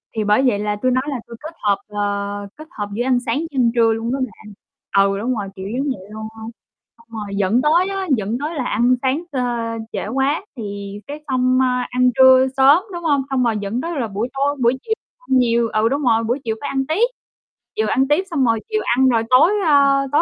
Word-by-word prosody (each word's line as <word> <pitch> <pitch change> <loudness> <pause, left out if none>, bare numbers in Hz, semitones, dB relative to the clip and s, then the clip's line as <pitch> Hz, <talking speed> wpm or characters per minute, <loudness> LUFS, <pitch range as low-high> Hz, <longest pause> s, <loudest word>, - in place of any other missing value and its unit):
Thì 220 - 0
bởi 210 +4 +3
vậy 225 -6 +2
là 210 0 -1
tui 255 - +2
nói 255 +1 +1
là 270 -4 -3
tui 235 - -9
kết 315 +2 -7
hợp, 205 -2 +2
ờ, 205 -1 -3
kết 310 +1 -11
hợp 205 -1 -5
giữa 235 +4 -1
ăn 255 -1 +2
sáng 230 +1 0
với 330 - -3
ăn 250 -4 +2
trưa 230 -1 +4
luôn 225 +1 -3
đó 275 - -2
bạn. 220 -4 -6 0.5
Ừ, 195 0 -1
đúng 245 +4 -1
rồi, 205 -3 -4
kiểu 190 - -7
giống 275 +2 -1
vậy 200 -8 -5
luôn 220 0 -6
hông? 220 +1 -8 0.5
Xong 230 0 -23
rồi 200 -1 -5
dẫn 200 +5 +2
tới 335 +6 +3
á, 390 -1 -3
dẫn 215 +2 -2
tới 305 +4 -4
là 275 - -2
ăn 245 +2 +2
sáng 270 +5 0
t - - -10 0.6
trễ - - -3
quá 270 - 0
thì 200 -2 -6
cái 295 +1 -8
xong, 255 -1 +2
a, 250 -1 0
ăn 250 0 +3
trưa 260 0 +7
sớm, 280 +7 +6
đúng 345 0 -6
hông? 290 -4 +2
Xong 265 -2 +1
rồi 230 -2 +1
dẫn 205 +5 -3
tới 335 -1 -3
là 235 - -1
buổi 210 +4 -3
tối, 280 +1 0
buổi 240 +2 +3
chiều 445 - -1 0.3
ăn - - 0
nhiều, 235 -2 +2
ừ, 215 +1 +1
đúng 280 +3 -1
rồi, 230 -3 +3
buổi 240 +5 -1
chiều 225 -2 -2
phải 285 - -4
ăn 270 -1 -1
tiếp. 405 +10 +2 0.7
Chiều 220 - 0
ăn 265 +5 +2
tiếp 295 +6 +2
xong 280 -6 +1
rồi 225 -1 +2
chiều 430 -1 0
ăn 260 +2 +3
rồi 230 -2 +2
tối, 255 +9 +6
a, 280 -2 +4
tối, 290 - +4
250 Hz, 245 wpm, -20 LUFS, 220-275 Hz, 0.7 s, trưa